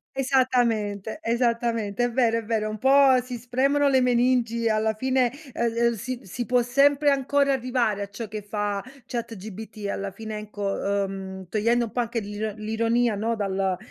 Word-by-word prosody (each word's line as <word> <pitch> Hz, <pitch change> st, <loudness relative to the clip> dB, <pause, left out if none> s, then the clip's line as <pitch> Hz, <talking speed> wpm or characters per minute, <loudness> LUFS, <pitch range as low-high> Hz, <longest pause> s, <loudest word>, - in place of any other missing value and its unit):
Esattamente, 245 Hz, -5 st, +1 dB
esattamente. 230 Hz, -2 st, 0 dB
È 245 Hz, -, +1 dB
vero, 230 Hz, -2 st, +2 dB
è -, -, -7 dB
vero. 215 Hz, -1 st, -1 dB
Un 215 Hz, -, -5 dB
po' 265 Hz, -1 st, +5 dB
si 250 Hz, -1 st, -6 dB
spremono 270 Hz, +4 st, +1 dB
le 265 Hz, -2 st, +4 dB
meningi. 240 Hz, -2 st, +2 dB
Alla 220 Hz, 0 st, +1 dB
fine, 255 Hz, +1 st, +1 dB, 0.2 s
ehm, 235 Hz, -1 st, 0 dB
el 235 Hz, -1 st, +2 dB
si 250 Hz, +3 st, -4 dB
si 240 Hz, +6 st, -5 dB
può 250 Hz, 0 st, +3 dB
sempre 280 Hz, +3 st, +4 dB
ancora 275 Hz, 0 st, +2 dB
arrivare 245 Hz, -5 st, 0 dB
a 200 Hz, -, -4 dB
ciò 210 Hz, +2 st, -6 dB
che 215 Hz, 0 st, -6 dB
fa 205 Hz, -1 st, -2 dB, 0.2 s
ChatGPT. 220 Hz, -2 st, -6 dB
Alla 200 Hz, 0 st, -3 dB
fine, 215 Hz, +2 st, -6 dB
ecco, 200 Hz, -1 st, -2 dB
ehm, 190 Hz, -1 st, -7 dB
togliendo 230 Hz, +5 st, +1 dB
un 215 Hz, -, -9 dB
po' 245 Hz, -, +1 dB
anche 230 Hz, 0 st, -2 dB
l'iro 210 Hz, +1 st, -4 dB
l'ironia, 225 Hz, +1 st, +1 dB
no, 225 Hz, +2 st, -1 dB
dal 195 Hz, -2 st, -1 dB
230 Hz, 170 wpm, -25 LUFS, 210-250 Hz, 0.2 s, po